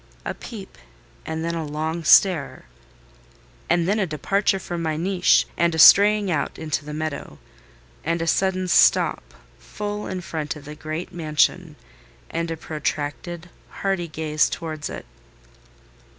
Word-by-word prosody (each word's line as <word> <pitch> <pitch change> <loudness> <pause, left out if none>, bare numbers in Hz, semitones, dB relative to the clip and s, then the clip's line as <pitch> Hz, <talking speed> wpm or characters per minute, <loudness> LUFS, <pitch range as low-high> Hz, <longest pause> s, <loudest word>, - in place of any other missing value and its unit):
A - - -2
peep, 210 -5 -10 0.5
and 160 +1 -3
then 170 - -2
a 165 -1 -3
long 155 +2 -3
stare; 160 - +4 1.0
and 175 0 +2
then 205 +3 +1
a 195 - 0
departure 195 +6 0
from 175 -2 -5
my 160 -2 -1
niche 180 +2 +3
and 170 -1 +1
a - - -3
straying 205 +3 +7
out 145 -4 -2
into 150 -5 -3
the 150 - -8
meadow; 155 - -5 0.7
and 165 +2 -1
a 165 - -2
sudden 185 +2 +1
stop - - +4 0.4
full 210 0 -5
in 185 -1 -4
front 155 -3 -4
of 150 - -12
the 150 - -8
great 155 +3 -6
mansion, 160 0 0 0.6
and 165 0 -2
a 165 - -4
protracted, 155 +3 -4 0.2
hardy 195 -3 -2
gaze 155 -1 0
towards 155 -3 -5
it. - - -8
165 Hz, 145 wpm, -23 LUFS, 155-185 Hz, 1.0 s, straying